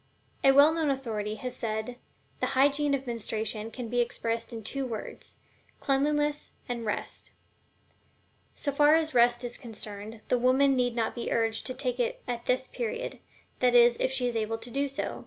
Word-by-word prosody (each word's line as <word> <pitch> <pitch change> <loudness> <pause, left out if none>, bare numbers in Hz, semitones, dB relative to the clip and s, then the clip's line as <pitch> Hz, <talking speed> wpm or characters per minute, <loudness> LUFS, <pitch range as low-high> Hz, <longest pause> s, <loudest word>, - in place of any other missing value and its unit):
A 270 - +7
well 285 +3 +7
known 320 -2 0
authority 220 -6 -2
has 250 +3 -5
well - - -13 0.2
said: 245 +2 -9 0.4
"The - - +1
hygiene 285 +1 +3
of 275 0 -5
menstruation 220 -2 -3
can 240 +1 -6
be 245 +2 -1
expressed 230 0 -2
in 225 -2 -7
two 275 +6 -2
words: 230 -5 -7 0.4
CLEANLINESS 295 +1 0
AND 235 -2 -4
REST." 210 - -4 1.3
So 285 - -2
far 295 +2 +5
as 315 -2 +1
Rest 240 0 +4
is 240 0 -3
concerned, 215 -2 -7
the 250 - +2
woman 265 +2 +4
need 245 -2 +1
not 230 -2 0
be 240 - -4
urged 225 -1 0
to 255 - -4
take 250 -2 -2
it 240 - -1
at 240 -1 -4
this 255 +1 +1
period 475 +1 -4 0.4
that 250 -1 +3
is, 240 0 +7
if - - +1
she 260 -1 +1
is 240 - -3
able 225 0 -1
to 230 +2 -7
do 280 +2 0
so. 275 +1 -4
245 Hz, 185 wpm, -28 LUFS, 230-275 Hz, 1.3 s, A